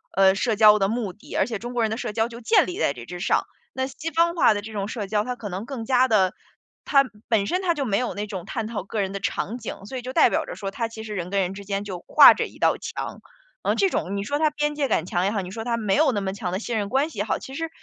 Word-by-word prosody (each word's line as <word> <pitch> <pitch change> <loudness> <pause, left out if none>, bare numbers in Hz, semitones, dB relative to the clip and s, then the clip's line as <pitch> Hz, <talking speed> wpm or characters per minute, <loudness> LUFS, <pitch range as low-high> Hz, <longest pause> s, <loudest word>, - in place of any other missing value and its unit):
呃， 190 0 +6
社 220 +1 0
交 210 -1 +7
的 195 - +2
目 220 -3 -2
的， 215 - -11
而 - - +3
且 225 -4 -4
中 240 +1 -6
国 240 - 0
人 220 - 0
的 220 - -2
社 215 - -3
交 225 +1 0
就 235 0 -10
建 225 - +4
立 180 - -5
在 140 - +2
这 120 -1 -10
之 180 0 -7
上。 - - +2 0.3
那 260 0 -1
西 295 +5 -6
方 340 +2 +2
化 270 -8 +5
的 205 - -3
这 220 +1 -9
种 200 -1 -2
社 215 -4 -4
交 210 0 +1
它 250 +1 -4
可 210 - -6
能 190 +3 -5
更 240 -4 -6
加 255 0 +3
的 190 -4 +3 0.5
它 275 -1 +4 0.2
本 205 -3 +2
身 365 +1 0
它 350 -2 +2
就 285 -4 -2
没 200 -1 +1
有 250 - -2
那 205 +1 -3
种 190 -4 -6
探 225 0 -3
讨 210 -5 -4
个 210 +2 -4
人 195 -1 -1
的 200 - -3
场 205 +3 -2
景。 200 -4 -7
所 260 +5 -6
以 - - -4
就 255 +1 -6
代 - - +5
表 - - 0
着 - - -7
说 195 -1 -4
它 230 +1 -3
其 220 -1 -8
实 215 -1 -6
人 180 -2 -4
跟 200 - 0
人 190 -1 0
之 200 +1 -9
间 200 +1 -3
就 185 -3 -5
挂 - - +8
着 - - -2
一 - - -16
道 - - +3
墙。 - - -6 0.4
嗯， - - +1
这 390 - +3
种 195 +3 -2
你 200 - -2
说 285 +7 -2
它 310 -1 +4
边 295 0 -1
界 285 -2 0
感 165 - +1
强 180 -2 -1
也 200 - +1
好， 215 - -1
你 180 -1 -8
说 225 +3 -5
它 235 0 -1
没 210 -4 +1
有 295 -3 +4
那 205 - -1
么 190 -1 -3
强 195 -4 -4
的 185 - -1
信 230 0 -3
任 205 -2 -2
关 275 +6 +1
系 - - -9
也 - - +2
好， - - -1
其 265 - -10
实 325 +3 -3
220 Hz, 345 characters per minute, -24 LUFS, 195-250 Hz, 0.5 s, 挂